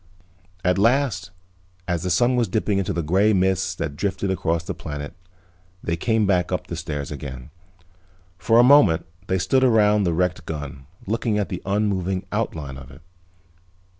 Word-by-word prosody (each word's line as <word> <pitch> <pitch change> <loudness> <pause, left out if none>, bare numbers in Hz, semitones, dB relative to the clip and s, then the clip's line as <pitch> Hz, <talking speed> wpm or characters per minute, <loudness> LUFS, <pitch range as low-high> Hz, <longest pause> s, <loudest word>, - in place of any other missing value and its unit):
At 90 +1 +2
last, 115 -5 +2 0.6
as 85 -3 -1
the 90 - -2
sun 125 +6 +3
was 120 -2 +1
dipping 100 0 0
into 95 - -1
the 85 - -2
gray 95 +7 +3
mists 95 -1 +1
that 70 - -4
drifted 95 +3 -2
across 85 -3 -1
the - - -4
planet 75 -1 -7 0.7
they 85 - -1
came 110 +5 +1
back 90 -3 +1
up 90 - -2
the 85 - -6
stairs 75 -4 -5
again. 65 -2 -7 0.9
For 100 +8 +3
a 120 - +8
moment 125 - +5 0.2
they 95 - +1
stood 130 +8 +2
around 105 -4 +4
the 85 - +1
wrecked 90 -1 -1
gun 75 -4 -6 0.2
looking 110 +1 -1
at 105 - -1
the - - -5
unmoving 95 -2 0
outline 80 -11 -3
of 65 0 -12
it. 70 +4 -15
95 Hz, 165 wpm, -23 LUFS, 80-105 Hz, 0.9 s, a